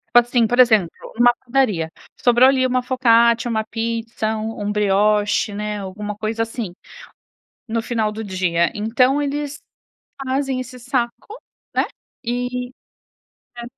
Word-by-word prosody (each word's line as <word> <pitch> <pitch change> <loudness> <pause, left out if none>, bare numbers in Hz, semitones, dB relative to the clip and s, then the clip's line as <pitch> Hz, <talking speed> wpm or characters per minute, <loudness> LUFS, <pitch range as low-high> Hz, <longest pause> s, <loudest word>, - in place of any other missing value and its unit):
sabe 240 0 +7
assim, 240 -2 +2
por 245 +2 0
exemplo, 220 -8 +5 0.3
numa 240 0 +6
padaria, 235 -11 +1 0.3
sobrou 245 +1 +6
ali 260 -1 +2
uma 255 0 +1
focaccia, 235 -2 +3
uma 220 -1 0
pizza, 225 -1 -2
um 220 0 -5
um 210 - 0
brioche, 210 +1 +2
né, 210 0 -3
alguma 205 +2 -5
coisa, 220 +2 -2
assim, 225 -5 -5 0.9
no 230 0 -1
final 225 -2 -1
do 220 +1 -6
dia, 180 -3 0
então 250 +6 +2
eles 290 0 -3 0.7
fazem 265 0 -1
esse 255 0 -9
saco, 250 - -3 0.3
né - - +3 0.4
e 245 +1 -3 0.9
É. - - -5
230 Hz, 135 wpm, -20 LUFS, 210-250 Hz, 0.9 s, sabe